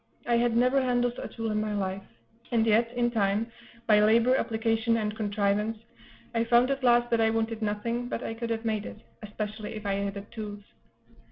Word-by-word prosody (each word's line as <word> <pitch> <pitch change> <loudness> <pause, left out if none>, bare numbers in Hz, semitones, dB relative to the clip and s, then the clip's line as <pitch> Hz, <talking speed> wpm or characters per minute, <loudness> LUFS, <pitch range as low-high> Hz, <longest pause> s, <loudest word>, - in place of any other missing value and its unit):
I 240 - +2
had 235 -1 +2
never 255 +3 +3
handled 245 -1 0
a - - -5
tool 225 -1 -4
in 215 0 0
my 215 -1 -2
life; 190 -1 -2 0.5
and 230 -2 +2
yet, 225 +1 +3
in 240 -1 +1
time, 215 +1 0 0.3
by 215 -2 +5
labor, 230 +4 +4
application, 225 -1 +1
and 210 -1 -2
contrivance, 210 +1 0 0.6
I 230 0 +1
found 240 +3 +4
at 275 -1 -2
last 240 -1 +4
that 230 -1 +3
I 220 - +4
wanted 225 0 -1
nothing 230 +3 -2
but - - -3
I - - -3
could 230 +1 -5
have 225 0 -2
made 215 -2 -1
it, - - -9 0.2
especially 215 0 -5
if 215 0 -8
I 200 - 0
had 200 0 -2
had 200 +1 -9
tools. 205 -2 -7
225 Hz, 200 wpm, -28 LUFS, 210-235 Hz, 0.6 s, by